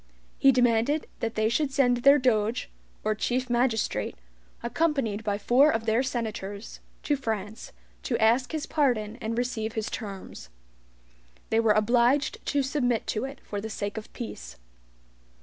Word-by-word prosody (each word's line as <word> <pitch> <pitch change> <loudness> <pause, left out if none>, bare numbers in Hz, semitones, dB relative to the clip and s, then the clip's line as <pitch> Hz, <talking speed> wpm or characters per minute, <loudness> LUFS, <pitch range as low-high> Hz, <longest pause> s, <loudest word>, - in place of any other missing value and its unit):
He 275 - +7
demanded 245 +4 +2
that 225 0 -3
they 220 0 +2
should 275 +5 0
send 260 -3 +3
their 275 +4 +6
Doge, 235 -2 +1 0.3
or 215 - +1
chief 250 +3 -1
magistrate, 235 - 0 0.5
accompanied 235 -5 0
by 205 -1 -1
four 250 +8 +4
of 225 -6 -1
their 225 +2 +2
senators, 220 -5 -4 0.2
to 290 - +1
FRANCE, 220 -4 -4 0.3
to 235 - -1
ask 235 +3 +3
his 315 -1 -3
pardon 240 -8 0
and 225 +1 -3
receive 230 -3 -2
his 220 -2 -3
terms. 195 - -7 1.0
They 225 - +3
were 225 -2 +4
obliged 240 +6 +2
to 285 -1 +1
submit 250 -4 0
to 215 +3 -2
it 270 +1 -8
for 205 -1 -5
the 220 - -5
sake 205 -1 -4
of 220 -1 -7
peace. 65 - -8
235 Hz, 150 wpm, -27 LUFS, 215-260 Hz, 1.0 s, He